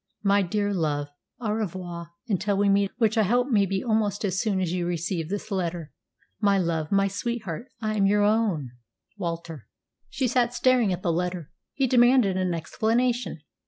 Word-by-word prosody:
My 200 0 +4
dear 205 +2 -1
love, 145 -5 -1 0.3
au 225 -4 -2
revoir 180 -5 -4 0.2
until 200 -1 0
we 200 0 +3
meet, 200 0 +3
which 225 -2 +2
I - - +6
hope 245 +6 +2
may 205 -5 +3
be 190 0 -2
almost 215 -3 0
as 190 0 0
soon 210 -4 0
as 180 -3 -1
you 180 -1 -1
receive 170 -1 -2
this 205 +2 -4
letter. 175 -5 -3 0.5
My 200 -2 +3
love, 165 -4 -1
my 195 0 +3
sweetheart, 220 -1 -4
I 215 -1 -1
am 195 -1 +4
your 205 +1 +3
own 205 - +1 0.5
WALTER." 165 - -5 0.4
She 265 -1 -1
sat 245 0 +1
staring 250 -5 +3
at 180 0 -3
the 170 - +1
letter. 175 -2 -3 0.2
He 270 - +2
demanded 245 -5 +4
an 185 -2 0
explanation. 225 - -1
200 Hz, 175 wpm, -26 LUFS, 175-220 Hz, 0.5 s, I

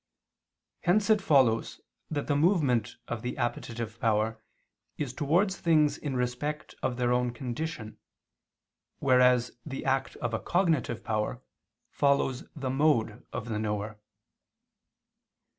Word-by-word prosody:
Hence 200 +4 +2
it 215 -1 +4
follows 130 -10 +3 0.3
that 145 -2 -2
the 145 - +1
movement 145 - +2
of 120 -2 -4
the 125 +1 -4
appetitive 115 -2 -3
power 110 -2 +1 0.6
is 135 -4 -3
towards 175 +9 +1
things 155 -3 +3
in 140 -3 -4
respect 125 +5 -2
of 125 -2 -1
their 125 -1 +2
own 125 0 +1
condition, 120 -1 -5 1.0
whereas 125 -2 +4
the 135 -3 -6
act 135 0 0
of 120 -2 -3
a 115 - 0
cognitive 165 - 0
power 110 +3 -2 0.5
follows 140 -2 +1
the 135 -4 -3
mode 130 -6 +1
of 115 - -5
the 105 -2 -1
knower. 105 0 -3
125 Hz, 125 wpm, -29 LUFS, 115-150 Hz, 1.0 s, it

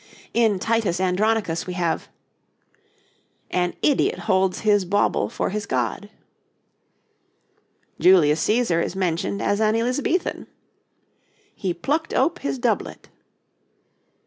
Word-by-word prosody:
In 225 -4 +3
'Titus 220 -3 0
Andronicus' 190 -2 0
we 180 - -4
have: 175 -2 -2 1.4
'An 180 -1 0
idiot 290 - +2
holds 190 -2 +1
his 205 -2 +3
bauble 200 +3 +1
for - - -2
his 210 0 -4
God.' 130 - -2 1.9
Julius 165 -5 +5
Cæsar 215 -7 +1
is - - -4
mentioned 185 +1 -1
as 205 +1 0
an 215 0 +2
Elizabethan: 255 +9 -1 1.1
'He 190 - -3
plucked 300 - -2
ope 335 - +1
his 140 -1 -3
doublet.' - - -2
195 Hz, 105 wpm, -23 LUFS, 175-225 Hz, 1.9 s, Julius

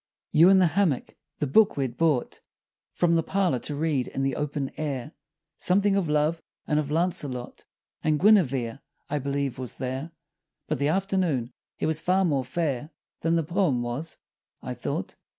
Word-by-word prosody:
You 165 +4 +7
in 195 - +7
the 185 - +5
hammock. 170 -9 +1 0.2
The - - -1
book 200 +9 +4
we'd 130 -4 -1
brought 155 -6 +1 0.5
From 175 -1 +2
the 165 - +4
parlor 180 -7 0
to 145 - -4
read 145 -4 0
in 135 - -3
the 135 -1 0
open 145 -2 -2
air, 145 -2 -3 0.5
Something 195 +2 +3
of 190 -5 0
love 150 +2 +1 0.2
and 150 - +1
of 145 -2 -2
Launcelot 150 -6 -1 0.4
And 155 -1 +2
Guinevere, 140 - +3 0.3
I 150 - 0
believe, 140 -1 -2
was 125 -3 -4
there 130 +4 -4 0.6
But - - -1
the 140 - +2
afternoon, 175 - 0 0.2
it - - -2
was 160 0 0
far 185 +1 +2
more 140 -6 +1
fair 145 0 -2 0.3
Than 165 0 +1
the 165 - +2
poem 160 -7 +1
was, 125 +7 -4 0.4
I - - -5
thought. - - -4
150 Hz, 170 wpm, -26 LUFS, 135-175 Hz, 0.6 s, You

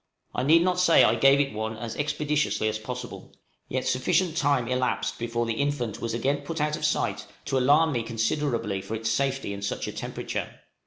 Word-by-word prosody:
I - - -1
need 160 +6 +5
not 180 0 +1
say 175 -2 +6
I 110 - +5
gave 135 +4 +5
it 140 -3 0
one 110 +1 -4
as 115 0 -5
expeditiously 150 -5 0
as 110 0 -1
possible; 125 +2 -7 0.4
yet 130 0 -2
sufficient 160 +7 +1
time 140 -6 +1
elapsed 125 0 -1
before 120 0 -1
the 115 - -1
infant 125 -3 -2
was 115 -1 -2
again 135 +5 +1
put 165 -1 -5
out 150 0 +1
of - - -8
sight - - 0 0.2
to 135 - +1
alarm 145 +5 +4
me 120 -4 0
considerably 115 -2 -1
for 110 - -5
its 110 0 -2
safety 135 -3 -1
in 100 - -7
such 100 - -3
a - - -3
temperature. - - -5
130 Hz, 200 wpm, -26 LUFS, 115-145 Hz, 0.4 s, say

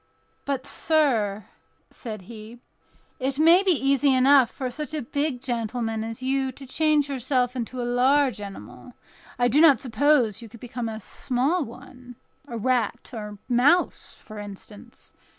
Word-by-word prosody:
"But, 275 -2 -2
sir," 230 - 0 0.5
said 215 -5 -8
he, 220 +3 -11 0.6
"it 265 +1 -2
may 330 +4 +6
be 395 - 0
easy 275 -3 +2
enough 260 -1 +5
for 255 -2 -5
such 300 +3 -5
a 300 - -3
big 285 +1 -2
gentleman 230 -2 -3
as 225 +3 -7
you 265 0 0
to 275 - -12
change 300 +2 +2
himself 255 -2 -1
into 250 +1 -5
a - - -1
large 250 -1 +2
animal; 125 - -10 0.4
I 245 0 +3
do 275 +6 +3
not 315 -5 +7
suppose 255 -4 +2
you 230 - -10
could 230 +2 -14
become 240 -1 -5
a 220 0 -6
small 265 - -1
one—a 245 -1 -12
rat, 245 0 -1
or 210 -2 -7
mouse, 265 +9 +2
for 215 -1 -9
instance. 205 0 -11
250 Hz, 150 wpm, -25 LUFS, 225-280 Hz, 0.6 s, not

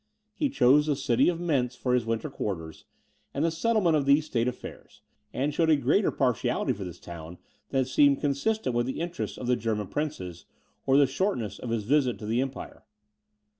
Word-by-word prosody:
He 295 -3 0
chose 150 - +4
the 150 - +2
city 130 -1 +2
of 170 -1 -2
Mentz 135 -8 0
for 125 -1 -1
his 120 -2 +1
winter 115 -1 -2
quarters, 80 -6 -5 0.5
and 145 +4 +1
the 165 - +1
settlement 175 0 +2
of 140 -2 0
these 145 +2 +4
state 120 -5 0
affairs, 125 - -8 0.3
and 140 +3 -1
showed 165 +1 +2
a 155 - +6
greater 145 - +2
partiality 125 -5 0
for 100 - -7
this 90 -2 -8
town, 85 0 -9 0.3
than 135 -1 +1
seemed 140 +2 +4
consistent 145 - 0
with 120 +1 +1
the 130 - -4
interests 170 +1 -4
of 130 - -6
the 125 +1 +2
German 105 -4 -2
princes, 95 - -4 0.4
or 135 0 +5
the 145 - +6
shortness 130 - -2
of 125 - -6
his 115 -2 -1
visit 130 +1 +2
to 105 - -8
the 115 +4 +1
Empire. 135 0 -6
130 Hz, 195 wpm, -27 LUFS, 115-150 Hz, 0.5 s, a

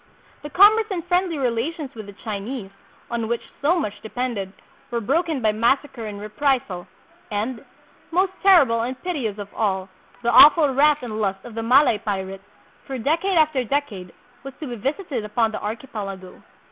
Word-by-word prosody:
The 295 - -7
^commerce 430 +7 +5
and 355 -5 -3
friendly 360 -2 +1
relations 270 +4 -2
with 215 -3 -9
the 200 - -11
Chinese, 210 0 -5 0.4
on 230 -1 -2
which 235 +1 -2 0.2
so 320 +6 +3
much 210 -9 -4
depended, 220 -4 -3 0.4
were 235 - -1
broken 290 - 0
by 215 - +4
massacre 235 +2 0
and 205 -1 -7
reprisal; 210 -4 -1 0.4
and, 220 +4 -3 0.5
most 370 +3 +1
terrible 280 -13 +5
and 250 +2 -4
piteous 270 - -2
of 205 -1 -8
all, 190 -3 -1 0.3
the 235 - +2
awful 295 0 +7
wrath 295 +1 +3
and 220 -3 -4
lust 195 -1 -2
of 240 - -9
the 225 - -3
Malay 245 -1 +4
pirate, 195 -2 -4 0.5
for 270 -2 -4
decade 330 - 0
after 305 -5 +3
de 280 +5 +1
cade, 190 -10 -10 0.3
was 275 -1 -9
to 310 - -5
be 245 -3 -5
visited 275 - -3
upon 220 +1 0
the - - -5
archipelago. 205 -4 -6
240 Hz, 170 wpm, -23 LUFS, 210-295 Hz, 0.5 s, awful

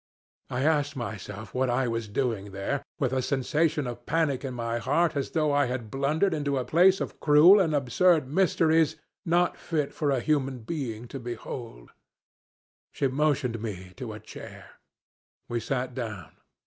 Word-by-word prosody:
I 130 +1 -1
asked 145 -2 +1
myself 110 -3 -6
what 130 0 +1
I 125 +1 +1
was 115 -1 -2
doing 105 -3 -2
there, 100 +9 -2 0.2
with 130 -2 0
a 130 - +1
sensation 150 +3 0
of 120 0 -7
panic 150 -5 +1
in 130 -2 -4
my 115 0 -2
heart 150 +8 +1
as 140 - -1
though 155 -2 +1
I 145 -2 +3
had 120 -4 -4
blundered 150 +8 +1
into 145 -3 -1
a 130 - -1
place 185 +4 +4
of - - -5
cruel 160 +7 +7
and 165 -5 +2
absurd 145 +3 +3
mysteries 160 -1 +3 0.3
not 175 +1 +2
fit 150 -4 -2
for 150 - -1
a 135 -2 +2
human 135 -2 0
being 120 -3 -4
to 135 - -6
behold. 115 - -7 1.0
She 140 - 0
motioned 130 -4 0
me 95 -5 -6
to 125 -4 -5
a 105 - -8
chair. - - -11 0.8
We 120 - -2
sat 125 +2 -2
down. 110 -8 -6
135 Hz, 165 wpm, -27 LUFS, 120-150 Hz, 1.0 s, cruel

